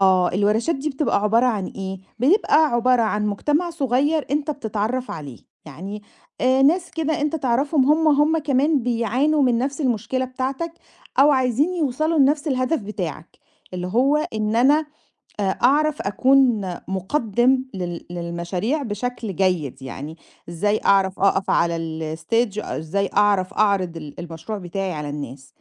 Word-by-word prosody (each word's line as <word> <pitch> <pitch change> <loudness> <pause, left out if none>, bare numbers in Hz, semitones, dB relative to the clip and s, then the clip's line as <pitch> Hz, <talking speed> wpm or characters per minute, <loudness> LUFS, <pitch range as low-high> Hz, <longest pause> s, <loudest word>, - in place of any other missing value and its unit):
آه، 185 -2 +4
الورشات 210 - +1
دي 285 +3 -3
بتبقى 270 -7 0
عبارة 225 +4 +3
عن 210 -6 0
إيه، 190 -1 -6 0.2
بيبقى 315 - +3
عبارة 245 -2 +2
عن 210 -1 0
مجتمع 295 - 0
صغيّر 290 0 0
أنت 295 +1 0
بتتعرّف 240 -1 -3
عليه، 145 -6 -7 0.3
يعني 190 +8 -8 0.4
آآ، 260 +1 +3
ناس 340 +5 +3
كده 320 0 -2
أنت 300 +2 0
تعرفهم 270 +1 +1
هم، 310 +2 +4
هم 300 +2 +3
كمان 285 -1 +1
بيعانوا 250 +6 +1
من 245 -3 +3
نَفْس 275 +4 -2
المشكلة 255 0 -1
بتاعتك، 265 +6 -4 0.5
أو 290 +2 +7
عايزين 265 +6 +1
يوصلوا 310 +1 0
لنَفْس 290 +3 +3
الهدف 260 +3 0
بتاعك، 180 -6 -6 0.4
اللي 180 0 -3
هو 260 +9 +3
إن 220 -7 -1
أنا، 290 +5 +4 0.5
آآ، - - 0 0.2
أعرف 300 +4 +3
أكون 255 +2 +3 0.3
مقدِّم 240 +6 +1
لل 175 -2 -5
للمشاريع 175 - -3
بشكل 225 -3 -4
جيد 170 -9 0
يعني، 145 +4 -7 0.3
إزاي 205 +5 0
أعرف 195 -1 +3
أقف 195 0 +2
على 170 0 +2 0.4
الstage 215 +5 -1
إزاي 195 +6 -2
أعرف 200 -2 +2
أعرض 195 -5 +1
ال 150 -2 -8
المشروع 170 +5 -6
بتاعي 190 0 -4
على 150 -1 -5
الناس. 140 -2 -7
235 Hz, 145 wpm, -22 LUFS, 190-280 Hz, 0.5 s, أو